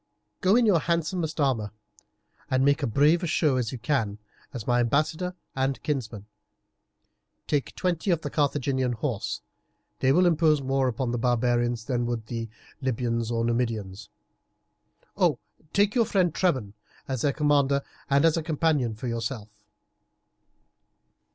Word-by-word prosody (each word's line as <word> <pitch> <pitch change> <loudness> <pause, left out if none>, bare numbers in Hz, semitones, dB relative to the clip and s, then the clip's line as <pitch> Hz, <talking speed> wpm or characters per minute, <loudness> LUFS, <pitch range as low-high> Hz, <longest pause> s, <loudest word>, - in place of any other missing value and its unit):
Go 190 +3 +4
in 245 0 +4
your 195 -6 +4
handsomest 165 0 -1
armour, 125 -7 +1 0.8
and 130 +1 +2
make 140 +2 +3
as 140 - 0
brave 150 +8 +4
a 175 - -2
show 155 -3 +2
as 120 -3 -1
you 130 - -5
can, 115 -5 -1 0.3
as 120 -6 -6
my 120 -1 +2
ambassador 155 +8 0 0.2
and 135 0 0
kinsman. 115 -9 -3 1.2
Take 145 -3 -1
twenty 180 +1 -1
of 170 -3 +2
the 145 - -5
Carthaginian 135 -3 0
horse; 110 -3 -3 0.6
they 130 - +3
will 180 +6 +4
impose 160 -3 +3
more 135 0 0
upon 125 0 -1
the 120 - -1
barbarians 120 -1 +1
than 120 -2 -1
would 120 -2 -3
the 115 -1 -5 0.3
Libyans 115 -3 -1
or 115 -1 0
Numidians. 115 -5 -2 1.6
Take 205 0 +2
your 235 -3 +3
friend 185 -6 +1
Trebon 135 - 0 0.3
as 130 -3 -2
their 145 - +2
commander 140 -2 +2 0.3
and 140 +2 +4
a 165 0 +3
companion 150 -7 0
for 115 +4 -6
yourself." 115 -1 -3
135 Hz, 140 wpm, -26 LUFS, 120-155 Hz, 1.6 s, Go